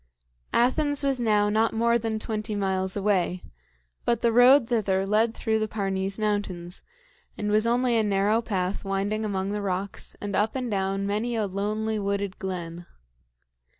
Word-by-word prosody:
Athens 290 +4 +2
was 275 -2 +1
now 210 -3 +3
not 220 +2 +2
more 235 +1 +3
than 220 -1 -2
twenty 215 -1 -4
miles 190 -1 -1
away, 190 -3 0 0.6
but 235 -2 +1
the 235 - +3
road 245 +2 +6
thither 195 -5 +1
led 220 +3 +2
through 220 0 0
the 215 - 0
Parnes 195 -2 -2
Mountains, 205 -5 -2 0.6
and 210 0 -2
was 215 +2 +3
only 245 0 +2
a 225 - +4
narrow 205 +2 +2
path 190 -4 -2
winding 200 +2 -1
among 195 -2 -2
the 210 0 -2
rocks 195 0 -3
and 205 -1 -4
up 215 +4 +1
and 250 -3 -2
down 195 0 -1
many 215 +4 -1
a 220 -2 0
lonely 210 +3 -2
wooded 200 -1 -2
glen. 175 -2 -5
210 Hz, 160 wpm, -26 LUFS, 195-225 Hz, 0.6 s, road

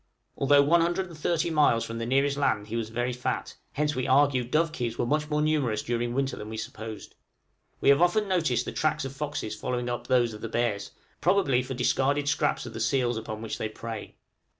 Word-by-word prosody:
Although 140 +1 +5
130 170 +4 +2
geographical 165 +1 0
miles 145 -7 +4
from 115 0 -5
the 115 - -3
nearest 140 +2 +2
land 110 -7 +1
he 115 - -3
was 115 -2 -2
very 120 +2 -1
fat, 125 0 -3 0.2
hence 150 +1 0
we 130 - -1
argue 135 -1 +4
dovekies 135 -3 -1
were - - 0
much 150 +4 0
more 150 0 +1
numerous 140 -9 +1
during 120 0 -2
winter 135 0 0
than 105 - -8
we 110 - -6
supposed. 110 -1 -7 0.7
We - - +4
have 140 +3 +6
often 205 +4 +3
noticed 160 -11 +1
the - - -4
tracks 155 -3 0
of 135 0 -6
foxes 145 -7 -3
following 125 +2 -3
up 120 - -4
those 120 -3 +3
of 105 - -9
the 115 - -4
bears, 115 -3 -1 0.3
probably 175 -8 +3
for 130 +1 -5
discarded 140 +3 +1
scraps 145 -3 +1
of 120 - -8
the 115 - -6
seals 120 +1 +1
upon 110 0 -5
which 115 - -4
they 110 - -2
prey. 110 0 -7
130 Hz, 205 wpm, -27 LUFS, 115-150 Hz, 0.7 s, have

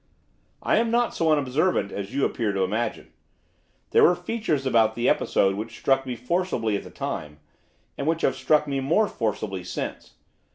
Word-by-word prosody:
'I - - +2
am 230 0 +2
not 240 +1 +1
so 160 -1 +1
unobservant 145 - +1
as 100 +1 -5
you 135 +1 +1
appear 110 -4 -1
to 95 -1 +1
imagine. 110 +5 -3 0.8
There - - +5
were 175 - +6
features 175 -6 -2
about 110 -4 +3
the 120 +1 0
episode 95 0 +2
which 110 +3 -6
struck 135 -1 +1
me 125 - -3
forcibly 125 - -1
at - - -2
the - - -11
time, 75 0 -5 0.6
and 140 - -2
which 165 0 0
have 135 - +2
struck 150 +3 +2
me 140 -1 -1
more 165 +11 +2
forcibly 105 - -3
since. 90 +1 -6
130 Hz, 175 wpm, -25 LUFS, 110-160 Hz, 0.8 s, were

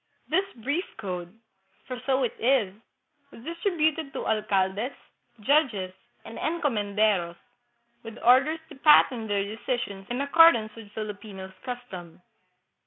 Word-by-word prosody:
This 375 +5 +2
brief 285 - -2
code 180 -5 -5 0.5
for 250 -1 -6
so 265 0 +2
it 240 - -1
is 235 -6 +2 0.6
was 230 - -14
distributed 320 -2 -1
to - - -4
alcaldes, 210 +2 0 0.5
judges, 220 -8 +2 0.3
and 225 - -8
encomenderos, 210 - 0 0.7
with 225 0 -10
orders 270 +7 +5
to 305 - -11
pat 300 +1 +7
tern 230 -4 -6
their 200 -1 0
decisions 210 -2 -4
in 245 +1 -2
accordance 280 -7 +5
with 210 -2 -12
Filipino 205 -3 -7
custom. 245 -10 -8
230 Hz, 120 wpm, -27 LUFS, 205-280 Hz, 0.7 s, pat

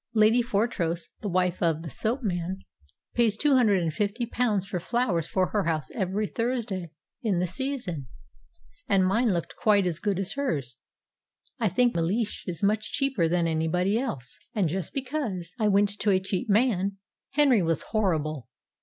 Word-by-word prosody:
Lady 220 +3 +5
Fortrose, 200 -7 -1
the 205 - -3
wife 180 0 +1
of 165 -1 +1
the 165 - -5
soap 240 - -2
man, 185 -1 -2 0.5
pays 225 -3 +2
two 290 +1 +3
hundred 210 -8 +4
and 160 -2 -1
fifty 210 +6 -1
pounds 225 -5 0
for 185 -2 -3
flowers 185 -4 0
for 185 -1 +1
her 210 -2 0
house 160 -2 -1
every 195 +1 -1
Thursday 220 -6 -2 0.3
in 210 -6 +1
the 180 - +1
season; 185 - -4 0.8
and 195 -2 +4
mine 225 +6 +2
looked 170 -3 -2
quite 205 -3 +3
as 170 -2 -1
good 200 0 0
as 195 -1 -2
hers. 145 - -2 0.8
I 220 -3 +2
think 245 +4 +3
Mellish 190 +7 -1
is 180 +1 -4
much 215 +1 +1
cheaper 265 - +1
than 170 0 +2
anybody 165 +6 +1
else. 140 - -5 0.2
And, 200 -5 +2
just 175 +1 -3
because 250 - -3
I 215 - +3
went 200 0 +4
to 210 - +1
a 190 -2 +4
cheap 190 +2 -3
man, 200 -3 +2 0.4
Henry 275 -7 +5
was 165 -1 0
horrible. 155 - -1
195 Hz, 170 wpm, -27 LUFS, 175-230 Hz, 0.8 s, Lady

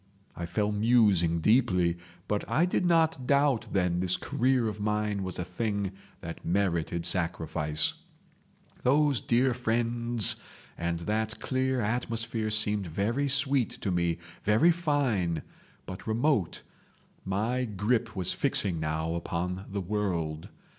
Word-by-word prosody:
I 85 - -5
fell 105 +4 0
musing 105 -7 +3
deeply, 90 -6 +3 0.3
but 105 -1 -1
I 165 - +3
did 180 0 0
not 160 -6 +2
doubt 140 -3 +2
then 90 -2 +1
this 90 0 +1
career 125 -1 +1
of 105 -1 -4
mine 105 -1 -1
was 95 -2 -4
a 90 - -3
thing 100 +1 -2 0.3
that 85 0 -7
merited 85 -2 0
sacrifice. 80 -4 0 0.9
"Those 140 -2 +3
dear 125 +2 +2
friends 115 -2 +1 0.4
and 85 0 -2
that 110 +4 -1
clear 130 -1 0
atmosphere 115 0 -1
seemed 105 -2 +1
very 110 - -1
sweet 135 -2 +2
to 100 - -1
me, 85 -2 0 0.3
very 110 +12 +5
fine, 135 - 0 0.4
but 95 +4 -8
remote. 110 - 0 0.6
My 110 +7 -1
grip 110 +2 -1
was 95 -2 +2
fixing 100 - 0
now 80 +1 -2
upon 90 +2 -3
the 100 0 -3
world. 85 -6 -2
105 Hz, 125 wpm, -29 LUFS, 90-120 Hz, 0.9 s, very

